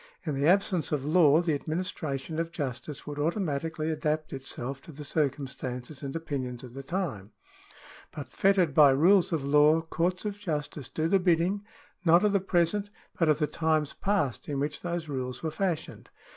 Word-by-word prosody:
In 155 Hz, -, -1 dB
the 140 Hz, +2 st, +1 dB
absence 185 Hz, -2 st, +2 dB
of 145 Hz, -3 st, -1 dB
law, 155 Hz, 0 st, +5 dB
the 165 Hz, -3 st, +1 dB
administration 155 Hz, -1 st, -3 dB
of 165 Hz, 0 st, -2 dB
justice 140 Hz, -1 st, -5 dB
would 145 Hz, -1 st, -6 dB
automatically 160 Hz, -1 st, -1 dB
adapt 155 Hz, 0 st, -2 dB
itself 135 Hz, 0 st, -5 dB
to -, -, -12 dB
the 150 Hz, 0 st, -9 dB
circumstances 135 Hz, -2 st, -3 dB
and 140 Hz, 0 st, -5 dB
opinions 130 Hz, -6 st, -4 dB
of 125 Hz, -2 st, -10 dB
the 135 Hz, -, -6 dB
time; 135 Hz, -, -4 dB, 0.8 s
but 145 Hz, -3 st, -7 dB
fettered 190 Hz, -6 st, +3 dB
by 145 Hz, -1 st, +7 dB
rules 175 Hz, +8 st, +4 dB
of 160 Hz, -4 st, -1 dB
law, 150 Hz, +3 st, +5 dB
courts 175 Hz, +4 st, -1 dB
of 205 Hz, -1 st, -3 dB
justice 150 Hz, -, -4 dB
do 160 Hz, 0 st, -1 dB
the 195 Hz, +3 st, +3 dB
bidding, 180 Hz, +3 st, +2 dB, 0.4 s
not 170 Hz, +1 st, +5 dB
of 210 Hz, -, +3 dB
the 200 Hz, -, +3 dB
present, 190 Hz, +2 st, +1 dB, 0.3 s
but 165 Hz, -3 st, +3 dB
of 150 Hz, -, +4 dB
the 150 Hz, -, +1 dB
times 155 Hz, 0 st, 0 dB
past 195 Hz, -, -1 dB
in 140 Hz, -2 st, -2 dB
which 145 Hz, +2 st, -2 dB
those 175 Hz, -2 st, -3 dB
rules 130 Hz, -2 st, -4 dB
were 160 Hz, -, -1 dB
fashioned. 165 Hz, -2 st, -3 dB
155 Hz, 175 wpm, -28 LUFS, 140-175 Hz, 0.8 s, by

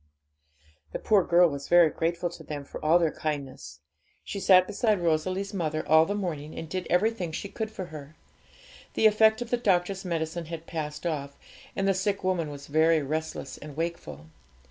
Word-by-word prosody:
The -, -, -1 dB
poor 205 Hz, -4 st, +3 dB
girl 175 Hz, +1 st, +5 dB
was 140 Hz, -3 st, -5 dB
very 175 Hz, -2 st, +6 dB
grateful 170 Hz, +1 st, -1 dB
to 170 Hz, -, -11 dB
them 145 Hz, -1 st, -6 dB
for -, -, -9 dB
all 160 Hz, +3 st, +5 dB
their 165 Hz, -3 st, +1 dB
kindness. 135 Hz, -, -5 dB, 0.4 s
She 200 Hz, -, -5 dB
sat 185 Hz, -1 st, +6 dB
beside 210 Hz, 0 st, +1 dB
Rosalie's 185 Hz, +4 st, -1 dB
mother 155 Hz, -5 st, -2 dB
all 160 Hz, +1 st, +6 dB
the 205 Hz, -, -1 dB
morning, 160 Hz, -7 st, -4 dB
and 165 Hz, -, -5 dB
did 185 Hz, +2 st, -4 dB
everything 185 Hz, -2 st, +1 dB
she 180 Hz, -, -5 dB
could 220 Hz, +2 st, -4 dB
for 195 Hz, -4 st, -6 dB
her. 150 Hz, 0 st, -9 dB, 0.8 s
The -, -, +2 dB
effect 220 Hz, +2 st, +5 dB
of 240 Hz, -, -14 dB
the 245 Hz, -, +3 dB
doctor's 190 Hz, -3 st, +1 dB
medicine 165 Hz, -1 st, -3 dB
had 165 Hz, 0 st, -7 dB
passed 150 Hz, -1 st, -5 dB
off, 140 Hz, -4 st, -3 dB, 0.4 s
and 195 Hz, -, 0 dB
the 195 Hz, -, +4 dB
sick 195 Hz, +1 st, -1 dB
woman 180 Hz, -4 st, 0 dB
was 140 Hz, -1 st, -9 dB
very 155 Hz, +1 st, +3 dB
restless 155 Hz, -1 st, -4 dB
and 150 Hz, -1 st, -10 dB
wakeful. 160 Hz, -, -4 dB
170 Hz, 185 wpm, -27 LUFS, 155-190 Hz, 0.8 s, very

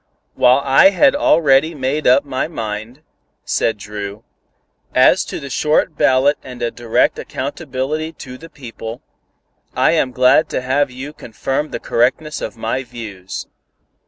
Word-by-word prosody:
"While 125 Hz, +2 st, +4 dB
I 135 Hz, +8 st, +6 dB
had 265 Hz, +7 st, +3 dB
already 155 Hz, -, +3 dB
made 140 Hz, +2 st, -1 dB
up 135 Hz, +3 st, +5 dB
my 130 Hz, 0 st, -2 dB
mind," 115 Hz, -1 st, -6 dB, 0.4 s
said 115 Hz, -, 0 dB
Dru, 105 Hz, 0 st, -7 dB, 0.7 s
"as 130 Hz, +8 st, +5 dB
to -, -, -6 dB
the 140 Hz, -2 st, -8 dB
short 155 Hz, +2 st, +1 dB
ballot 140 Hz, 0 st, +3 dB
and 125 Hz, -2 st, -10 dB
a 120 Hz, -, 0 dB
direct 120 Hz, -2 st, 0 dB
accountability 155 Hz, +5 st, -4 dB
to 130 Hz, -4 st, -10 dB
the 165 Hz, -, -12 dB
people, 115 Hz, -4 st, -9 dB, 0.7 s
I -, -, +3 dB
am 130 Hz, -, +1 dB
glad 125 Hz, +4 st, +4 dB
to -, -, -2 dB
have 135 Hz, +3 st, +1 dB
you 130 Hz, +4 st, -8 dB
confirm 135 Hz, +4 st, -3 dB
the -, -, -5 dB
correctness 135 Hz, +6 st, 0 dB
of -, -, -6 dB
my 115 Hz, +4 st, -2 dB
views." 110 Hz, -7 st, -8 dB
130 Hz, 145 wpm, -18 LUFS, 120-150 Hz, 0.7 s, I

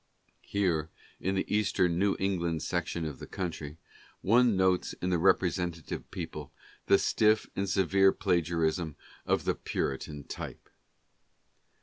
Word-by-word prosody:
Here 85 Hz, -6 st, 0 dB, 0.3 s
in 95 Hz, +2 st, -1 dB
the 95 Hz, -, 0 dB
eastern 95 Hz, -5 st, +1 dB
New 100 Hz, 0 st, +2 dB
England 85 Hz, -5 st, 0 dB
section 85 Hz, -2 st, -2 dB
of 75 Hz, -4 st, -5 dB
the -, -, -8 dB
country, 80 Hz, -5 st, -5 dB, 0.4 s
one 115 Hz, 0 st, +4 dB
notes 95 Hz, -1 st, +2 dB
in 90 Hz, -, -3 dB
the 90 Hz, -, +2 dB
representative 85 Hz, -1 st, 0 dB
people, -, -, -6 dB, 0.4 s
the 100 Hz, -, +6 dB
stiff 110 Hz, +1 st, +3 dB
and 100 Hz, 0 st, -1 dB
severe 95 Hz, 0 st, +4 dB
pharisaism 85 Hz, -4 st, 0 dB, 0.3 s
of -, -, +2 dB
the -, -, +2 dB
Puritan 70 Hz, +2 st, -3 dB
type. -, -, -8 dB
90 Hz, 125 wpm, -30 LUFS, 80-95 Hz, 0.4 s, the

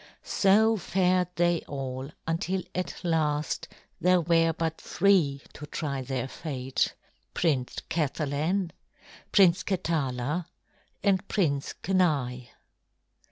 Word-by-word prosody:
So 220 Hz, +3 st, +4 dB
fared 185 Hz, -1 st, +2 dB
they 175 Hz, -1 st, +2 dB
all 135 Hz, -1 st, -4 dB, 0.2 s
until 175 Hz, +3 st, -1 dB
at 185 Hz, 0 st, -4 dB
last 155 Hz, -3 st, 0 dB, 0.3 s
there 180 Hz, 0 st, +4 dB
were 165 Hz, 0 st, +3 dB
but 160 Hz, 0 st, -3 dB
three 170 Hz, -8 st, +2 dB
to 150 Hz, -, -9 dB
try 140 Hz, -3 st, -3 dB
their 130 Hz, -1 st, -3 dB
fate, 135 Hz, -3 st, -2 dB, 0.4 s
Prince 140 Hz, -7 st, +1 dB
Kathalan, 155 Hz, +4 st, -1 dB, 0.6 s
Prince 190 Hz, -2 st, +5 dB
Katala, 155 Hz, -4 st, -1 dB, 0.6 s
and 195 Hz, -1 st, +2 dB
Prince 145 Hz, -8 st, 0 dB
Kenai. 145 Hz, -10 st, +1 dB
165 Hz, 100 wpm, -28 LUFS, 140-180 Hz, 0.6 s, Prince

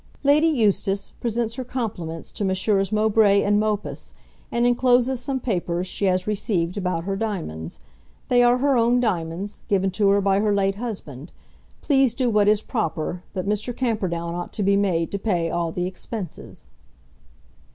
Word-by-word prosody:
"Lady 295 Hz, +3 st, +5 dB
Eustace 205 Hz, -, +1 dB
presents 230 Hz, -1 st, -2 dB
her 255 Hz, +2 st, -4 dB
compliments 200 Hz, -10 st, -5 dB
to -, -, -4 dB
Messrs. 195 Hz, +1 st, +1 dB
Mowbray 215 Hz, -1 st, +4 dB
and 205 Hz, 0 st, +3 dB
Mopus, 210 Hz, -1 st, -3 dB, 0.4 s
and 235 Hz, 0 st, +1 dB
encloses 245 Hz, +1 st, +3 dB
some 265 Hz, +2 st, -2 dB
papers 180 Hz, -6 st, -2 dB
she 200 Hz, -, -3 dB
has 185 Hz, -1 st, +1 dB
received 190 Hz, -4 st, -1 dB
about 180 Hz, -4 st, -2 dB
her 195 Hz, +2 st, -2 dB
diamonds. 175 Hz, -, -4 dB, 0.5 s
They 245 Hz, -1 st, +4 dB
are 245 Hz, 0 st, +5 dB
her 275 Hz, +1 st, +2 dB
own 240 Hz, +1 st, +3 dB
diamonds, 185 Hz, -3 st, -2 dB
given 195 Hz, -1 st, +1 dB
to 200 Hz, +1 st, +2 dB
her 200 Hz, 0 st, +4 dB
by 195 Hz, 0 st, +2 dB
her 210 Hz, -1 st, +2 dB
late 195 Hz, 0 st, +1 dB
husband. 180 Hz, -, -6 dB, 0.5 s
Please 270 Hz, -5 st, +3 dB
do 250 Hz, -2 st, +1 dB
what 210 Hz, -1 st, +3 dB
is 210 Hz, 0 st, +3 dB
proper, 180 Hz, -7 st, -2 dB
but 185 Hz, 0 st, -3 dB
Mr. 210 Hz, +4 st, -1 dB
Camperdown 185 Hz, -9 st, -1 dB
ought 175 Hz, 0 st, -5 dB
to 210 Hz, -, -2 dB
be 200 Hz, +1 st, +3 dB
made 180 Hz, -5 st, +1 dB
to 200 Hz, -, -3 dB
pay 175 Hz, -6 st, 0 dB
all 170 Hz, -1 st, -1 dB
the 180 Hz, +2 st, -2 dB
expenses." 185 Hz, 0 st, -7 dB
200 Hz, 165 wpm, -23 LUFS, 185-235 Hz, 0.5 s, Lady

